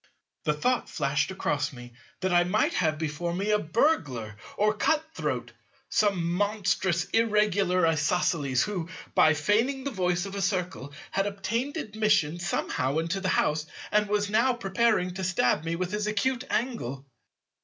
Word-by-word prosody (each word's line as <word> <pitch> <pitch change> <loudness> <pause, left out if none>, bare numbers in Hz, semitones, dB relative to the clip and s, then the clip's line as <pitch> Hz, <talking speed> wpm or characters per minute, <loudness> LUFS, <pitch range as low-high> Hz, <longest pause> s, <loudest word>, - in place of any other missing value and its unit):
The 150 - +2
thought 250 +11 0
flashed 140 +1 0
across 150 -6 -1
me 120 -2 -11 0.3
that 185 -1 0
I 175 0 +5
might 180 - +1
have 155 -3 +1
before 160 +2 -3
me 200 +3 -1
a 210 - +3
burglar 155 - 0 0.2
or 210 +1 +3
cut 305 +8 +1
throat, - - -3 0.4
some 180 -5 +1
monstrous 195 -3 +1
Irregular 205 -5 +3
Isosceles, 155 -4 +1
who, 180 -5 -3 0.2
by 155 0 +5
feigning 230 - +1
the 280 - -3
voice 180 -4 0
of 195 - -7
a 200 - -3
Circle, 180 -7 -2 0.2
had 195 +1 0
obtained 230 +9 -2
admission 210 - +1
somehow 140 -5 -1
into 165 +4 -1
the 185 - 0
house, 155 -3 +1 0.2
and 210 -1 +2
was 205 0 +1
now 230 +5 +3
preparing 215 -4 +1
to 190 +1 -5
stab 170 -6 +1
me 165 +1 -1
with 180 +1 -3
his 210 0 -1
acute 250 +5 0
angle. 140 - -2
185 Hz, 155 wpm, -27 LUFS, 160-210 Hz, 0.4 s, I